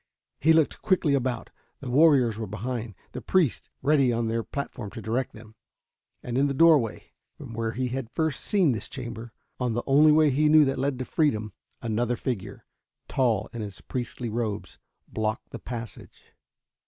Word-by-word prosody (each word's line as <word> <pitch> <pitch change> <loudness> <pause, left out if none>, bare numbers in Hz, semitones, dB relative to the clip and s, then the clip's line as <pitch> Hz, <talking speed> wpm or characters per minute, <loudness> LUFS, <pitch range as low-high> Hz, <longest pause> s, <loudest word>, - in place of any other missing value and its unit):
He 160 - +4
looked 160 -2 +3
quickly 185 -7 +2
about. 130 -3 -1 0.3
The 130 -3 -6
warriors 130 -6 +4
were 110 - -3
behind, 110 +1 -4 0.2
the - - -6
priests 175 -9 +1
ready 140 -4 +4
on 115 -1 0
their 115 +1 0
platform 125 -4 -5
to 115 - -9
direct 120 +3 -1
them. 110 0 -13 0.7
And 125 +1 -1
in 140 - +3
the 140 - -2
doorway, 150 -7 +3 0.3
from 115 - -9
where 115 0 -2
he 125 +2 -1 0.3
first 160 -2 0
had - - -10
seen 190 -8 +4
this 115 - -4
chamber, 120 -3 -6 0.3
on 125 -3 -1
the 120 - -1
only 150 +3 +6
way 155 -1 +5
he 150 +3 +3
knew 155 -1 +7
that 135 -1 -1
led 135 0 0
to 130 - -4
freedom, 110 -11 0 0.3
another 120 +2 0
figure, 120 -5 -5 0.4
tall 115 -6 +1
in 120 - -5
its 100 -3 -7
priestly 120 -1 -5
robes, 110 -3 -3 0.3
blocked 110 0 -3
the - - -7
passage. 120 -2 -9
125 Hz, 175 wpm, -26 LUFS, 115-140 Hz, 0.7 s, knew